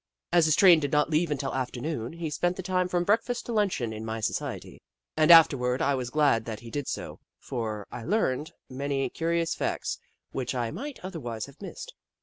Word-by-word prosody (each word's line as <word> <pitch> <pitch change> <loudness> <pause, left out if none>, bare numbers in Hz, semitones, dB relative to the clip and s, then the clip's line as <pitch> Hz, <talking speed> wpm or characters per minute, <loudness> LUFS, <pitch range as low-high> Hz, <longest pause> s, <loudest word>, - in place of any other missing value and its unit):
As 170 -2 +6
his 155 -1 +4
train 180 -4 +7
did 145 -2 -2
not 150 +2 +2
leave 160 +2 +2
until 140 -2 -2
afternoon, 125 0 -3
he 165 -2 -4
spent 175 +4 0
the 190 - -5
time 185 0 +1
from 175 -1 0
breakfast 230 +5 +1
to - - -5
luncheon 185 - 0
in 110 0 -6
my 110 0 -4
society, 110 - -4 0.3
and 155 0 +3
afterward 135 -7 +6
I 140 - +2
was 130 -2 -2
glad 140 -6 +2
that 110 -2 -6
he 115 -1 -10
did 145 +2 -3
so, - - -5 0.2
for 110 -5 -4
I 120 - -7
learned 155 - 0 0.2
many 135 0 -2
curious 165 0 0
facts - - -2 0.3
which 130 -1 -3
I 120 -2 -1
misfht 290 - -6
otherwise 120 - -5
have 140 +4 -17
missed. - - -8
145 Hz, 195 wpm, -27 LUFS, 125-175 Hz, 0.3 s, train